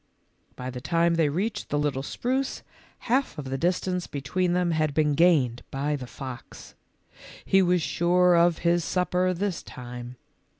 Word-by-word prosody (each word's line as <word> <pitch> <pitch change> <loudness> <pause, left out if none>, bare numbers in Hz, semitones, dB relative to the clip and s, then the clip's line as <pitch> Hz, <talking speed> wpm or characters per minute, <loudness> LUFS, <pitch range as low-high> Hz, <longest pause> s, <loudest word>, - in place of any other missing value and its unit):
By 125 0 -5
the 125 0 -7
time 170 +3 +2
they 165 -3 +2
reached 205 +8 -2
the 145 - 0
little 145 -2 0
spruce, 255 - -2 0.4
half 260 +3 0
of 135 -3 -6
the - - 0
distance 180 +1 0
between 175 +6 -1
them 180 -1 +1
had 155 -2 0
been 150 -2 +2
gained 140 -7 +3
by 145 +2 -1
the 130 -3 -7
fox. 130 -1 -9 0.7
He 195 - +4
was 180 -2 +2
sure 180 +2 +3
of 170 -1 +4
his 170 0 +3
supper 180 +1 +1
this 185 0 -2
time. 125 0 -9
170 Hz, 160 wpm, -26 LUFS, 140-180 Hz, 0.7 s, He